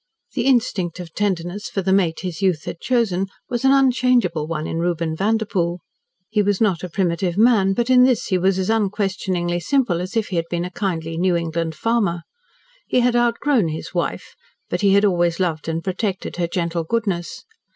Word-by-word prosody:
The 250 -1 -1
instinct 205 -9 +1
of 170 -2 -8
tenderness 190 -1 -2
for 195 - -2
the 190 +1 +2
mate 175 -4 +1
his 180 -1 -5
youth 180 -5 +1
had 170 - -6
chosen 210 -7 0 0.2
was 240 0 -2
an 265 - +5
unchangeable 250 - +2
one 155 -1 -3
in 165 - -3
Reuben 170 -2 -1
Vanderpoel. 195 -3 0 0.5
He 210 -1 +2
was 205 -1 +1
not 190 -7 +1
a 180 - -4
primitive 175 0 -1
man, 210 -4 +4
but 235 +4 0
in 255 -1 +6
this 250 -2 +3
he 185 - +1
was 190 +1 +2
as 190 +3 0
unquestioningly 190 -4 -1
simple 185 - +1
as 185 +6 -4
if 220 - 0
he 185 - -2
had 165 0 -2
been 175 0 -2
a 180 - -6
kindly 165 -5 -3
New 180 0 +2
England 165 -1 -2
farmer. 205 -7 0 0.6
He 250 - +2
had 245 0 +2
outgrown 240 - +2
his 160 0 -6
wife, - - -3 0.4
but - - -1
he 200 -1 +4
had 200 +1 +4
always 175 -3 +1
loved 165 -4 -1
and 165 0 -2
protected 190 0 -3
her 175 -1 0
gentle 170 -1 -2
goodness. 210 +4 -2
190 Hz, 195 wpm, -21 LUFS, 170-225 Hz, 0.6 s, in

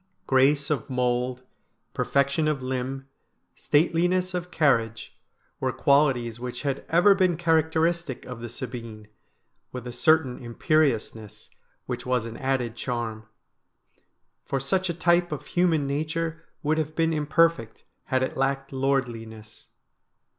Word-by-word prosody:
Grace 140 +2 +3
of 140 -6 -2
mould, 125 0 -1 0.5
perfection 140 +3 +1
of 145 -4 -1
limb, 130 +1 -3 0.5
stateliness 180 +4 +1
of 180 0 -3
carriage, 115 -9 +1 0.4
were - - 0
qualities 130 -5 +2
which 125 +3 -6
had 140 -1 -2
ever 175 +5 +6
been 185 -4 +2
characteristic 160 -2 +1
of 125 -2 -7
the 120 0 -6
Sabine, 115 -3 -7 0.6
with 125 -1 -7
a 125 - -5
certain 135 +1 +2
imperiousness, 120 - -1 0.3
which 125 -1 -4
was 125 -2 0
an 115 0 -7
added 130 -3 -1
charm; 115 -3 -4 1.2
for 135 - -2
such 185 +7 0
a - - 0
type 175 0 +2
of 150 - -5
human 170 -5 +1
nature 160 +3 -3 0.2
would 155 +2 +1
have 155 0 -3
been 165 0 +1
imperfect 155 -5 +1 0.2
had 130 0 +1
it 130 - -3
lacked 135 0 -1
lordliness. 115 -5 -3
135 Hz, 125 wpm, -26 LUFS, 125-160 Hz, 1.2 s, ever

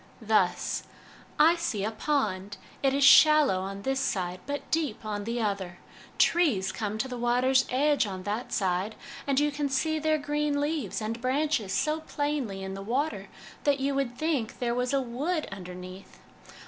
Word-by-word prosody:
Thus: - - +1 0.3
' - - -23
I 320 +3 +6
see 235 - -2
a 220 - -1
pond; 205 -7 -1 0.2
it 270 - +3
is 280 +1 +1
shallow 300 -7 +7
on 195 +1 -6
this 270 0 0
side, 180 -7 -2
but 285 0 -5
deep 290 -9 -1
on 205 -1 -3
the 235 +2 -2
other; 195 -5 -2 0.4
trees 245 - +3
come 210 +1 -3
to 240 - -1
the 250 -2 -6
water's 255 +2 +3
edge 285 -1 +2
on 190 -2 -6
that 210 +5 -3
side, 190 +2 0 0.3
and 275 -1 +3
you 295 0 +2
can 285 0 -2
see 315 +4 0
their 310 0 +2
green 295 0 -1
leaves 290 - -2
and 225 +2 -4
branches 260 -5 0
so 310 +1 0
plainly 290 -10 -3
in 190 0 -5
the 195 - -6
water 230 -2 -2 0.4
that 285 -1 +2
you 275 +1 0
would 270 -3 -2
think 290 -7 -1
there 240 -1 -1
was 250 0 -1
a 275 -1 +2
wood 295 +8 -2
under 180 -2 -8
neath. 185 +1 -11
250 Hz, 180 wpm, -28 LUFS, 205-290 Hz, 0.4 s, shallow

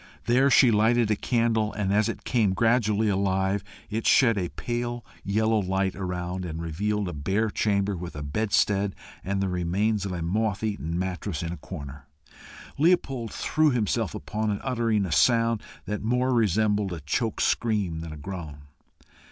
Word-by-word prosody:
There 130 +4 +4
she 125 -1 +6
lighted 110 +1 +3
a - - +3
candle, 115 -1 +1
and 100 -2 -1
as 105 +2 +3
it - - -5
came 110 -6 +2
gradually 110 -1 +2
alive, 95 0 +1 0.2
it 110 +2 -2
shed 125 -5 +5
a 90 -4 -2
pale 120 0 -4 0.2
yellow 110 +2 +2
light 95 0 -1
around, 90 -1 -4
and 80 -2 -5
revealed 100 +5 -2
a 90 - -4
bare 95 +9 0
chamber, 100 -2 0
with 85 -2 -7
a 75 - -5
bedstead 100 +4 +1 0.3
and 100 +1 -1
the 100 - +1
remains 95 +4 0
of 100 - -3
a 85 -2 -3
moth 105 +4 -1
eaten 95 -6 -2
mattress 90 -2 -3
in 85 - -3
a - - -7
corner. 70 -6 -9 0.7
Leopold 140 -8 +2
threw 155 0 +2
himself 115 -4 0
upon 110 0 -3
it, 100 -1 -1
uttering 115 -5 +1
a 90 - -5
sound 115 +6 +3 0.2
that 105 0 -3
more 125 +3 +1
resembled 105 -2 +2
a 80 - -6
choked 110 - -1
scream 105 -8 0
than 80 -1 -6
a 75 - -8
groan. 75 -3 -7
105 Hz, 170 wpm, -26 LUFS, 90-115 Hz, 0.7 s, she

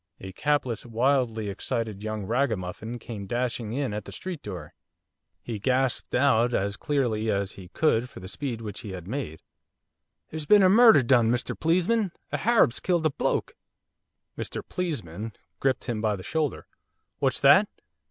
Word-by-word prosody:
A 95 - -8
capless, 130 0 0
wildly 120 -2 +1
excited 110 0 -3
young 110 -2 -4
ragamuffin 110 -2 -2
came 110 -4 -7
dashing 120 -1 -2
in 135 -4 -1
at 105 - -4
the - - -9
street 180 -5 -6
door. 90 -7 -7 0.7
He 115 -3 -5
gasped 130 +3 0
out, 125 -2 +3
as 100 +1 0
clearly 115 -5 0
as 100 -1 0
he 95 -2 -11
could 125 - +1
for - - -11
the 90 - -9
speed 120 +1 -4
which 105 -3 -6
he 100 -4 -7
had 90 -2 -8
made: 105 - -5 0.9
'There's 155 -2 -5
been 205 +2 +7
murder 225 - +7
done, 120 -2 +4
Mr 120 0 -1
Pleesman, 185 +6 +2 0.2
a - - 0
Harab's 225 - +3
killed 175 -3 0
a 155 - +3
bloke.' - - -1 0.8
'Mr - - -5
Pleesman' 110 - -4 0.3
gripped 135 -2 +1
him 115 -4 -3
by 110 -1 +1
the 95 - -9
shoulder. 155 +3 -2 0.5
'What's - - +1
that? - - +6
120 Hz, 160 wpm, -26 LUFS, 105-140 Hz, 0.9 s, been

